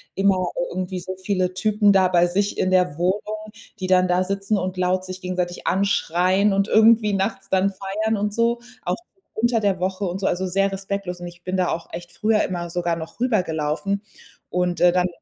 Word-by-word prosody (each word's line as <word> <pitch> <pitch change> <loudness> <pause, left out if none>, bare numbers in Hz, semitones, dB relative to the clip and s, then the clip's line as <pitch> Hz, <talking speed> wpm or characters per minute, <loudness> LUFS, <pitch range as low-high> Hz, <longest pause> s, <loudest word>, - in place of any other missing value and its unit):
immer 190 -2 +2 0.2
irgendwie 185 0 -4
so 185 +1 -5
viele 185 -1 -1
Typen 210 +1 +3
da 190 -1 +5
bei 175 -1 +3
sich 200 +3 -1
in 185 - +1
der 180 -5 +2
Wohnung, 210 +4 -2 0.3
die 185 - -1
dann 185 0 +4
da 180 +1 +2
sitzen 195 +2 -1
und 185 0 -3
laut 185 0 +1
sich 185 0 -7
gegenseitig 180 -1 -3
anschreien 190 +1 +2
und 195 +1 +1
irgendwie 220 -1 +5
nachts 195 0 -2
dann 190 +1 +3
feiern 200 +3 -2
und 205 0 -1
so. 235 +1 +1 0.2
Auch - - 0 0.4
unter 235 +1 +1
der 200 -3 +1
Woche 190 +2 -2
und 180 +1 -3
so, 195 - 0
also 185 +2 0
sehr 195 +2 +1
respektlos. 195 -2 -4
Und 175 - -7
ich 175 0 -13
bin 185 +1 -2
da 180 -1 +1
auch 165 - -4
echt 175 0 -8
früher 215 0 +2
immer 175 -2 -3
sogar 170 -1 -1
noch 165 +4 -9
rübergelaufen. 185 -4 0 0.5
Und, 180 -1 -1
äh, 175 0 +6
dann 180 0 +2
185 Hz, 195 wpm, -22 LUFS, 180-200 Hz, 0.5 s, äh